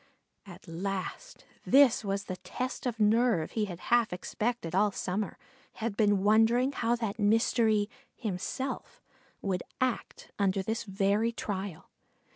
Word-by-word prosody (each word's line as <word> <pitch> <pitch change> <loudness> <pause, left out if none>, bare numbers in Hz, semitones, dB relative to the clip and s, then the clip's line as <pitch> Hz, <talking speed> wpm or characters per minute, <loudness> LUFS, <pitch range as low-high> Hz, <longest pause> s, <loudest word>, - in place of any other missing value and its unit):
At 180 0 -12
last, 195 - -5 0.2
this 270 -4 +5
was 200 0 -1
the 185 -2 -5
test 255 +5 -4
of 230 -2 -3
nerve 215 -5 +3
he 215 -2 0
had 180 -4 -7
half 240 -2 +4
expected 195 0 -3
all 205 +3 +4
summer; 195 +2 -3 0.4
had 225 -2 -3
been 205 -3 +3
wondering 225 +5 +4
how 235 -3 +1
that 225 -3 -3
mystery 220 0 +3 0.3
"himself" 235 +5 -4 0.4
would 185 -3 0 0.2
act 255 -2 -2
under 195 -1 +2
this 220 +4 -2
very 200 +3 +1
trial. 195 -6 -5
210 Hz, 130 wpm, -30 LUFS, 195-235 Hz, 0.4 s, this